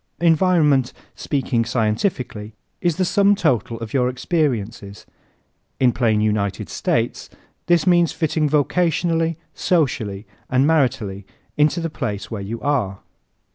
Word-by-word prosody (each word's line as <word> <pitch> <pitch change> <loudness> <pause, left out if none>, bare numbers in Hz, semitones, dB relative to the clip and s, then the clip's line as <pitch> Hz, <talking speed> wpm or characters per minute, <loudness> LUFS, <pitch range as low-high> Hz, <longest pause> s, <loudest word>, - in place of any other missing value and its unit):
Environment, 160 -6 +3 0.2
speaking 130 -5 -1
scientifically, 110 - -2 0.3
is 175 -2 +1
the 185 - 0
sum 200 +2 +3
total 125 - 0
of 115 - -7
your 125 -2 +2
experiences. 120 - -2 0.7
In 125 -2 +4
plain 115 -3 +1
United 105 -2 -1
States, - - -1 0.4
this 175 -2 +3
means 175 -2 +4
fitting 155 -2 0
vocationally, 165 +2 +1 0.2
socially 115 - -1 0.2
and 130 +1 +3
maritally 120 -11 0 0.3
into 150 +3 +2
the 165 -1 -3
place 105 -7 -4
where 110 -3 -4
you 110 +4 -5
are. 120 -10 -1
135 Hz, 120 wpm, -21 LUFS, 110-165 Hz, 0.7 s, In